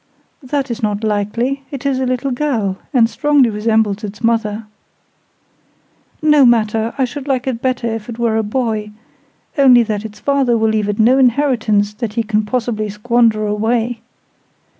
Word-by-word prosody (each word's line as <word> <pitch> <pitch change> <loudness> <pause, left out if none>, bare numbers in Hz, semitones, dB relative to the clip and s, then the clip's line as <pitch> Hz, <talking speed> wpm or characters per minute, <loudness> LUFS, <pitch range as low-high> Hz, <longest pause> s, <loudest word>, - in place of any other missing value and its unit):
"That 275 -1 -3
is 235 - -5
not 210 0 -1
likely; 220 +6 -1
it 275 -2 -7
is 270 -2 0
a 260 - -1
little 255 +2 -1
girl, 240 -8 -1
and 235 -4 +4
strongly 285 -1 +2
resembles 215 -1 0
its 210 +2 -7
mother." 225 -1 0 1.6
"No 300 -2 +5
matter; 225 -2 +2
I 265 - +2
should 280 +2 -7
like 260 -3 0
it 245 -3 -3
better 255 -2 -1
if 225 -1 -4
it 230 - -6
were 230 -2 0
a - - +2
boy—only 225 +3 0
that 210 -2 -3
its 215 -1 -9
father 275 -4 +1
will 220 0 +1
leave 215 -1 0
it 205 - -2
no 245 +5 +4
inheritance 235 -6 +2
that 220 -1 -5
he 230 0 0
can 215 -1 0
possibly 220 -2 -2
squander 220 +1 +1
away. 225 +2 -1
230 Hz, 160 wpm, -17 LUFS, 215-255 Hz, 1.6 s, No